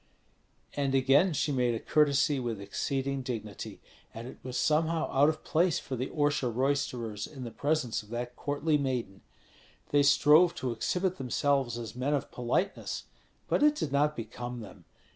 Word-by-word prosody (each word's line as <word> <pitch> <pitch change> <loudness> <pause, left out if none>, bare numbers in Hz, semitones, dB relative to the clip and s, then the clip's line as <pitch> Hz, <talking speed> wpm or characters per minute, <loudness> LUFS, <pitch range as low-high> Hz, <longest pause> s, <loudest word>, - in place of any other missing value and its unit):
And 140 -2 0
again 140 +7 +4
she 150 +1 0
made 125 -3 +1
a - - -3
courtesy 145 0 +2
with 120 -4 -3
exceeding 135 +6 -2
dignity, 110 -5 -6 0.4
and 115 +2 -7
it - - -11
was 125 0 -5
somehow 160 +3 +1
out 140 +3 +5
of 155 0 -4
place 170 +1 +2
for 130 - -5
the 130 +2 -2
Orsha 145 -4 +1
roisterers 120 -4 -1
in 135 -4 -9
the 120 - -6
presence 145 -4 -1
of 105 - -18
that 120 +1 -4
courtly 150 +1 0
maiden. 125 -8 -3 0.7
They 145 - +5
strove 150 +4 +5
to 130 - -2
exhibit 180 +10 -1
themselves 135 -1 0
as 115 -1 -7
men 135 +4 0
of 140 - -4
politeness, 125 +11 -2 0.4
but - - +1
it 300 0 +5
did 155 - -3
not 150 +2 +2
become 120 +2 -6
them. 105 - -12
135 Hz, 165 wpm, -30 LUFS, 120-150 Hz, 0.7 s, out